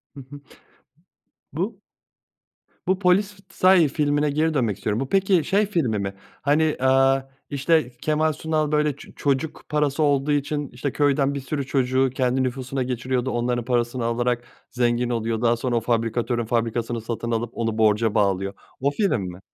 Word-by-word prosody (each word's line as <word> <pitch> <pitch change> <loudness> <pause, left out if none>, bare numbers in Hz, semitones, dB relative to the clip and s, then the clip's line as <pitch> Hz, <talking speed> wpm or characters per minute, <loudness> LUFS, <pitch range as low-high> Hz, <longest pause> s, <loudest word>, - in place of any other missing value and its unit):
Hı - - -9
hı. 145 - -10 1.1
Bu - - -3 1.1
Bu 190 0 +2
Polizei 190 -2 +3
filmine 145 0 +1
geri 155 +2 +1
dönmek 115 -8 0
istiyorum. 105 +2 -2
Bu 135 - -3
peki 190 -4 +3
şey 205 +2 +2
filmi 140 - 0
mi? 100 0 -3 0.3
Hani, 145 +3 +3 0.2
eee, 135 0 +3 0.2
işte, 140 -1 +1
Kemal 155 0 +1
Sunal 155 0 -1
böyle 150 -2 +1
ço - - -13
çocuk 145 +2 -1
parası 150 0 +1
olduğu 145 0 +2
için, 145 0 -1
işte, 130 +3 -4
köyden 140 -1 +2
bir 140 - -3
sürü 140 +1 -3
çocuğu 130 -1 +1
kendi 130 0 +1
nüfusuna 130 +1 -2
geçiriyordu, 125 +1 -2
onların 120 0 -1
parasını 120 -1 0
alarak 120 +1 0 0.3
zengin 120 0 +1
oluyor, 115 -1 -1
daha 120 0 +3
sonra 120 0 -1
o 115 - +1
fabrikatörün 120 0 0
fabrikasını 115 0 -1
satın 115 +1 -4
alıp 115 0 -1
onu 115 -1 -2
borca 110 0 +2
bağlıyor. 100 -1 +1 0.3
O 140 +2 +1
film 160 - +1
mi? 90 0 -6
130 Hz, 155 wpm, -23 LUFS, 120-150 Hz, 1.1 s, Polizei